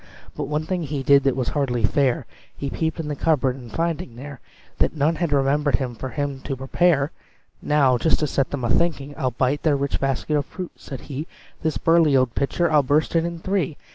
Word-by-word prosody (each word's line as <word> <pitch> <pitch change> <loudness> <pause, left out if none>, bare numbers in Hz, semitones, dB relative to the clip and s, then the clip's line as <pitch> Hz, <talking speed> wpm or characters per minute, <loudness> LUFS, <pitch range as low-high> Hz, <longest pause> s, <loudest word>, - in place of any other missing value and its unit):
But - - -3
one 150 +1 -2
thing 180 +1 -2
he 145 -3 -3
did 140 0 +6
that 135 - +3
was 130 -2 -1
hardly 125 -5 -1
fair 130 +3 +2 0.3
He 140 -1 -4
peeped 160 0 -2
in 160 - -3
the 150 - -2
cupboard, 140 -4 +1
and 125 -4 -11
finding 165 -7 -2
there 140 +1 -9 0.4
That - - +1
none 155 +2 +1
had 170 -2 -1
remembered 140 -1 +2 0.2
for 130 - -4
him 145 -1 -3
to 135 - -4
prepare, 140 +2 +2 0.5
"Now, 135 -4 +3
just 160 - +3
to - - +3
set 135 -1 0
them 140 -3 -4
a 120 - 0
thinking, 145 -3 +1
I'll 130 - 0
bite 130 +4 0
their 155 -3 +3
rich 140 0 -1
basket 135 +2 -1
of 145 - -2
fruit," 185 -2 -7
said 135 - -9
he, 150 +3 -6 0.3
"This 160 -1 0
burly 165 -4 +4
old 130 -3 +2
pitcher 160 +4 0
I'll 150 -1 +5
burst 145 +5 +1
it 165 0 +3
in 170 0 -4
three! 185 -5 -1
145 Hz, 215 wpm, -23 LUFS, 135-160 Hz, 0.5 s, did